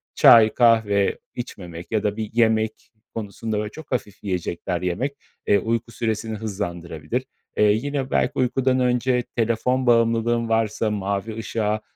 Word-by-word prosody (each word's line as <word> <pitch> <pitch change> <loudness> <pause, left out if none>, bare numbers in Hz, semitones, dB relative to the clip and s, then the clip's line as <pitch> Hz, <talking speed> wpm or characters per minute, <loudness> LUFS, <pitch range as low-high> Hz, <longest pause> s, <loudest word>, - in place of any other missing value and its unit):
çay, 110 -2 +7
kahve 110 -4 +3 0.2
içmemek 90 -8 -8
ya 110 -2 0
da 105 0 -1
bir 110 -1 -3
yemek 110 -1 +1 0.2
konusunda, 110 0 -4
böyle, 105 0 -3
çok 160 +3 -12
hafif 105 -6 -3
yiyecekler 90 -2 -3
yemek, 105 +11 -1 0.3
eee, 100 - +5
uyku 115 +1 -2
süresini 110 -1 -2
hızlandırabilir. 85 - -4 0.3
Eee, 105 -1 +5
yine 135 +4 -2
belki - - +2
uykudan 130 +1 +1
önce 125 0 +1
telefon 120 +3 +1
bağımlılığın 115 0 +2
varsa, 110 -1 +1
mavi 100 +1 -2
ışığa, 110 -1 -1
110 Hz, 135 wpm, -23 LUFS, 105-120 Hz, 0.3 s, çay